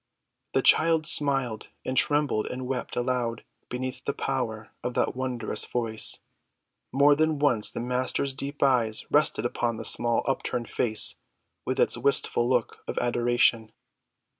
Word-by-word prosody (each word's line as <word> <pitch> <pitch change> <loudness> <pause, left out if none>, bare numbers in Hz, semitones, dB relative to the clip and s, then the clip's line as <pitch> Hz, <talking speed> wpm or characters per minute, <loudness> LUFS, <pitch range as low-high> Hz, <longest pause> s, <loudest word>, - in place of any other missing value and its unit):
The - - +3
child 160 -1 +4
smiled 135 -8 +1 0.2
and 130 - -2
trembled 145 -6 +2
and 125 0 -5
wept 125 -1 -4
aloud 120 -2 -1 0.3
beneath 125 0 -5
the 140 - -3
power 110 -4 -3
of 125 - -3
that - - 0
wondrous 125 -3 -1
Voice; 115 -3 -1 0.7
more 140 +2 +5
than 155 +1 +1
once 130 -7 +2
the - - -5
Master's 130 +2 -1
deep 140 +2 -4
eyes 120 -5 +1
rested 150 -6 +2
upon 120 -1 -1
the - - -4
small 120 -1 +2
upturned 125 -3 -2
face 110 -3 +2 0.5
with 130 +1 -1
its - - +2
wistful 120 -2 +1
look 125 -3 0
of - - -5
adoration. 120 -2 +1
125 Hz, 140 wpm, -26 LUFS, 120-140 Hz, 0.7 s, more